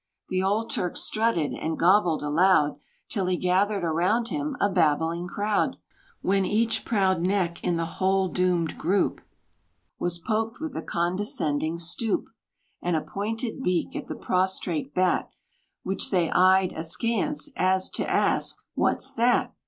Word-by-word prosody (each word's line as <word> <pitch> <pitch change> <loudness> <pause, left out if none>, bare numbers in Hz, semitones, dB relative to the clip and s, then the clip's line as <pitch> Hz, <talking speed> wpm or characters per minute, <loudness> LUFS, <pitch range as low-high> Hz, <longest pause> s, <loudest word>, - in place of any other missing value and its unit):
The 185 0 0
old 215 +4 0
Turk 180 -5 -1
strutted, 215 -9 +1
and 160 0 -3
gobbled 175 -3 +3
aloud, 150 0 +3 0.3
Till 195 -5 -2
he 180 -1 +1
gathered 190 +2 +1
around 180 +9 +1
him 295 -1 -3
a - - +3
babbling 170 -1 +1
crowd; 205 +3 0 0.5
When 195 +1 +2
each 225 +3 +1
proud 190 -5 +2
neck 180 -2 0
in 175 -1 +1
the 165 - -1
whole 190 +3 +1
doomed 180 -3 0
group 190 +5 +1 0.8
Was 175 -1 -1
poked 220 +6 -2
with 315 -3 -5
a - - -2
condescending 170 -3 -1
stoop, 175 +6 -1 0.5
And 175 -1 0
a 155 - +1
pointed 225 - -4
beak, 180 -6 -1
at - - -5
the - - -5
prostrate 180 -5 -1
Bat, 185 0 +1 0.5
Which 190 - -2
they 175 -4 +1
eyed 185 0 +4
askance, 230 - -1
as 185 0 +2
to - - -2
ask, - - +1 0.2
"What's - - 0
that?" 240 +1 +2
185 Hz, 145 wpm, -26 LUFS, 170-210 Hz, 0.8 s, eyed